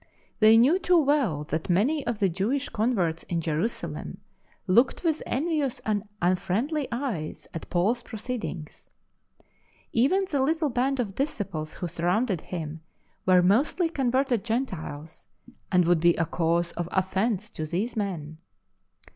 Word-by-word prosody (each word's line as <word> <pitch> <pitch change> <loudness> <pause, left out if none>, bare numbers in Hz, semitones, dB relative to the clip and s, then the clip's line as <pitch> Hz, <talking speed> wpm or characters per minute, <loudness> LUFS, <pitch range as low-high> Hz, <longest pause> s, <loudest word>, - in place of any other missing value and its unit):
They 220 0 +7
knew 280 +11 +5
too 360 -2 +3
well 275 - +2
that 155 +1 -3
many^ 250 - +2
of 240 -2 -1
the 200 -2 +2
Jewish 215 +11 -1
converts 195 -8 0
in 170 - 0
Jerusalem 165 +8 -3 0.5
looked 235 - +3
with 320 -2 +1
envious 295 -2 0
and 210 -2 +1 0.2
unfriendly 225 - 0
eyes 235 - -4
at 165 - -7
Paul 180 +4 +2
s 240 0 -4
pro 225 - -8
ceedings. 215 -9 -6 1.0
Even 310 +12 +3
the 285 -6 0
little 310 +1 +1
band 260 +3 0
of 210 -5 -1
disciples 195 - -3
w'ho - - -4
surrounded 175 +3 0
him 160 -3 -6 0.5
were 180 -1 +6
mostly 275 - +3
converted 260 -5 +1
Gentiles, 185 - -4 0.4
and 180 -2 +4
would 175 -1 +3
be 170 +1 +4
a 165 - +1
cause 170 +1 0
of 175 0 -4
offence 195 +3 0
to 155 - -4
these 195 +10 -2
men. 165 -7 -4
210 Hz, 145 wpm, -26 LUFS, 175-265 Hz, 1.0 s, They